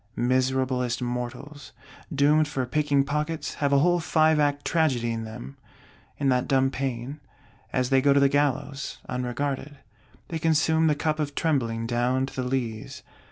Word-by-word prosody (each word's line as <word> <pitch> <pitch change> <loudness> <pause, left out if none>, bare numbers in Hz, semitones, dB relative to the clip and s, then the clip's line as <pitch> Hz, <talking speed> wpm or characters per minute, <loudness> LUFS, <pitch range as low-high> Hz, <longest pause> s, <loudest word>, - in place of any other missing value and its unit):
Miserablest 130 -1 0
mortals, 125 +4 -5 0.4
doomed 150 +1 +3
for 135 -3 -2
picking 145 +1 +1
pockets, 150 +3 -3
have 140 -1 +2
a 140 - +5
whole 175 +5 +3
five 160 -1 +3
act 145 -1 +1
Tragedy 130 -8 +1
in 115 -1 -3
them, 70 - -9 0.6
in 140 -2 +1
that 125 -1 +1
dumb 135 -1 +2
pain, 135 +1 -4 0.5
as 125 0 0
they 135 -1 +5
go 140 +1 +4
to 140 - +5
the 140 - +5
gallows, 140 0 -1
unregarded; 135 +3 -3 0.5
they 165 - -3
consume 160 0 +2
the 150 - +3
cup 155 +1 -1
of 145 -2 -2
trembling 115 -8 0
down 125 +2 +1
to 135 - -10
the 130 - -2
lees. 120 -4 -4
135 Hz, 160 wpm, -26 LUFS, 125-150 Hz, 0.6 s, a